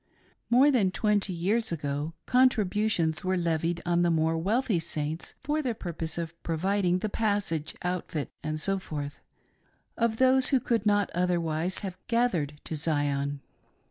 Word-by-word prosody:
More 260 +5 +6
than 220 -8 +3
twenty 210 0 +1
years 195 +6 0
ago 145 0 -3
contributions 210 -9 +2
were 185 0 +1
levied 170 0 0
on 175 0 +2
the 175 - +3
more 160 0 +2
wealthy 205 +4 +1
Saints 155 0 -3
for 300 +1 0
the 250 -5 -2
purpose 165 -5 -4
of 170 0 -5
providing 180 +2 +1
the 200 - -2
passage, 200 -8 -1
outfit, 180 -4 -3
&c., 155 +6 -1 1.2
of 230 -1 +1
those 260 +1 +4
who 265 - +4
could 230 -3 0
not 205 -1 +2
otherwise 175 -1 0
have 185 -2 -6
" - - -49
gathered 180 -12 0
to 160 - -5
Zion." 145 -2 0
180 Hz, 140 wpm, -28 LUFS, 160-215 Hz, 1.2 s, More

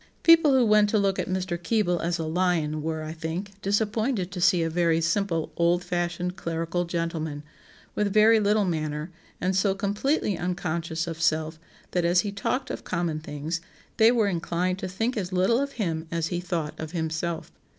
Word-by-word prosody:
] - - -38
"People 330 -4 +7
who 255 -2 +5
went 210 -1 +5
to 215 - +2
look 195 -2 +1
at - - -2
Mr. 185 -2 -2
Keble 180 -2 +1
as 170 0 0
a 165 - -3
'lion' 160 -2 0
were, 160 0 -3
I 155 0 -5
think, 165 +5 -4
disappointed 210 0 0
to 185 -2 -5
see 180 -2 +4
a - - 0
very 165 -1 +2
simple 170 0 0
old 175 +1 +2
fashioned 175 0 -2
clerical 165 0 -2
gentleman, 165 -3 -3 0.5
with 205 -1 0
very 215 +2 +6
little 210 0 +2
manner, 155 -1 -2 0.3
and 185 +1 0
so 195 0 +2
completely 205 +3 0
unconscious 170 -2 -2
of 165 -1 -6
self 160 -1 +1 0.3
that 180 - +1
as 175 +1 +4
he 205 - -3
talked 255 +6 -2
of - - -6
common 170 -3 -2
things, 155 +2 -4 0.4
they 225 +1 +6
were 235 -3 +2
inclined 180 0 -1
to 190 - -3
think 225 +7 -2
as 190 -4 -3
little 185 +6 +3
of 280 0 -3
him 165 -7 -2
as 165 -1 -1
he 175 - -2
thought 165 -4 -3
of 160 +1 -6
himself. 160 0 -3
175 Hz, 190 wpm, -26 LUFS, 165-200 Hz, 0.5 s, People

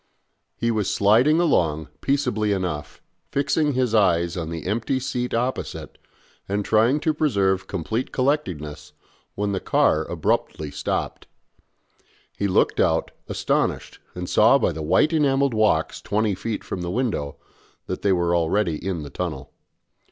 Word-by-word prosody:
He 115 0 0
was 105 -4 0
sliding 120 +11 +4
along 80 - +1
peaceably 125 -7 0
enough, 90 -6 -4 0.3
fixing 145 +1 +1
his 125 -3 0
eyes 85 -5 +3
on 80 -3 -4
the 85 -1 -6
empty 115 +6 -1
seat 125 -2 -3
opposite, 125 +3 -3 0.5
and 100 0 -1
trying 115 +7 +3
to 160 -1 +1
preserve 95 -11 +1
complete 105 +7 -3
collectedness 75 - -2 0.4
when 105 0 -1
the 95 - -1
car - - +2
abruptly 75 -2 -1
stopped. - - -3 1.1
He 100 - -1
looked 95 - +2
out, - - +2 0.2
astonished, - - -1 0.2
and 90 0 -5
saw 110 +9 +5
by 135 - +1
the 80 -1 -6
white 95 - +2
enamelled 140 -3 +2
walks 105 -8 +1
twenty 105 0 0
feet 110 +3 -4
from 90 - -5
the 85 - -3
window 105 - -2 0.5
that - - -4
they 100 - +2
were 85 -2 +2
already 85 0 0
in 90 -5 -3
the 70 - -9
tunnel. - - -5
105 Hz, 145 wpm, -23 LUFS, 85-125 Hz, 1.1 s, saw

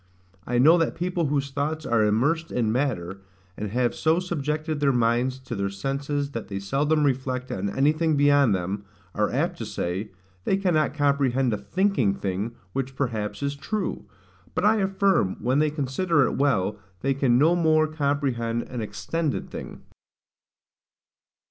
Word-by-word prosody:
I 125 - 0
know 160 +8 +6
that 165 - 0
people 175 -2 -1
whose 140 -1 -1
thoughts 150 +3 -2
are 115 -2 +2
immersed 145 +11 +1
in 115 -3 0
matter, 100 -8 -2 0.3
and 105 0 -4
have 120 +3 +1
so 160 +1 +2
subjected 155 -3 -2
their 140 -1 +3
minds 120 +1 +1
to 130 -2 -6
their 100 -1 -1
senses 140 +7 -2
that 115 -4 -5
they 100 - -4
seldom 145 +10 +1
reflect 130 -2 -1
on 100 +2 -2
anything 155 +6 +2
beyond 145 -6 +4
them, 95 +3 -3 0.3
are - - +1
apt - - -1
to - - -4
say, 95 +5 -3 0.3
they 190 - +1
cannot 175 -6 +1
comprehend 135 -4 +2
a - - 0
THINKING 130 - +1
thing 100 +5 -3 0.2
which 135 0 -3
perhaps 115 -3 -2
is 140 0 -1
true: 185 +8 -3 0.5
but - - +1
I 220 +1 +5
affirm, 195 - +1
when 130 +3 +1
they 155 0 +3
consider 150 +2 +1
it - - -1
well, 105 -8 +1 0.2
they 135 0 +1
can 130 -3 +2
no 160 +6 +4
more 160 -2 +3
comprehend 140 -6 -1
an 125 -2 -4
EXTENDED 110 - -3
thing. - - -8
135 Hz, 160 wpm, -25 LUFS, 115-155 Hz, 0.5 s, know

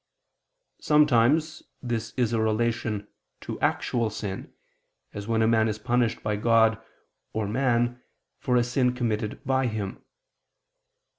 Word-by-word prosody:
Sometimes 150 +1 +3 0.2
this 115 -2 -3
is 120 -2 +1
a 115 - +1
relation 110 -1 -1 0.3
to - - -6
actual 115 -2 0
sin, 100 -2 -6 0.6
as 100 0 -6
when 115 -1 +2
a - - +3
man 110 -1 +3
is 110 -1 -2
punished 120 +1 0
by 105 0 0
God 115 0 +3 0.5
or 110 -2 -1
man 120 +1 0 0.4
for 125 - 0
a 120 - +4
sin 125 +1 +1
committed 110 -3 -2
by 130 -1 +1
him. 105 -4 -5
115 Hz, 130 wpm, -26 LUFS, 110-125 Hz, 0.6 s, a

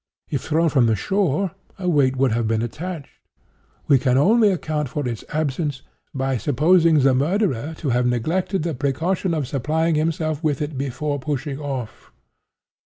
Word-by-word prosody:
If 140 -5 -1
thrown 160 +1 +1
from 130 -6 +3
the 110 - +2
shore 190 - 0 0.3
a 185 -2 -4
weight 140 -6 +3
would 130 -1 +2
have 115 0 0
been 110 0 0
attached. 155 +5 -6 0.7
We 135 - +5
can 125 0 +2
only 215 - +5
account 155 -6 -2
for 145 0 -3
its 115 -3 -4
absence 145 -2 -2 0.3
by 135 -1 -1
supposing 155 +4 +3
the 135 0 +4
murderer 160 - 0
to 150 - -3
have 125 0 +2
neglected 160 - 0
the 165 -1 -2
precaution 160 +7 -1
of 145 -5 -2
supplying 155 +5 0
himself 155 0 -1
with 145 -3 0
it 150 0 -3
before 140 +2 -2
pushing 140 0 -3
off. 135 -6 -6
145 Hz, 165 wpm, -22 LUFS, 130-165 Hz, 0.7 s, We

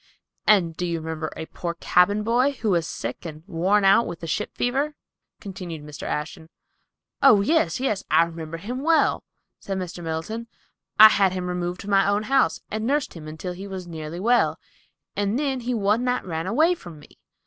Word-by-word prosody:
"And 180 -6 +4
do 180 - -4
you 170 -1 -1
remember 160 0 -4
a 160 - -5
poor 170 +1 -5
cabin 200 +5 +3
boy, 245 +5 +2
who 225 -6 -1
was 170 -3 +1
sick 120 +2 -5
and 155 -2 -8
worn 195 +3 +1
out 195 +4 +5
with 170 -1 -6
the - - -5
ship 210 +6 -3
fever?" 275 +5 -1 0.4
continued 180 -6 -7
Mr. 150 -1 -8
Ashton. 160 +1 -4 0.7
"Oh, 220 -7 +7
yes, 320 +6 +1
yes; 215 -7 -1
I 160 +2 +5
remember 165 -1 -6
him 245 +9 -5
well," 325 +2 +2 0.4
said 195 -1 -4
Mr. 180 -1 -6
Middleton. 165 +9 -4 0.5
"I 215 0 +12
had 195 -3 +3
him 185 -1 -3
removed 180 0 -3
to - - -10
my 195 0 +4
own 205 +1 +1
house, 270 +4 +2
and 215 +1 -2
nursed 285 +1 0
him 155 -3 -10
until 160 +4 -6
he 190 +3 -8
was 190 -2 -6
nearly 160 0 -7
well; 240 +5 +2 0.6
and 205 +3 0
then, 275 -2 -1
he 245 0 -2
one 210 +2 +1
night 250 0 -1
ran 165 -1 -3
away 315 - +3
from 175 - -10
me. 145 - -18
190 Hz, 190 wpm, -24 LUFS, 165-230 Hz, 0.7 s, I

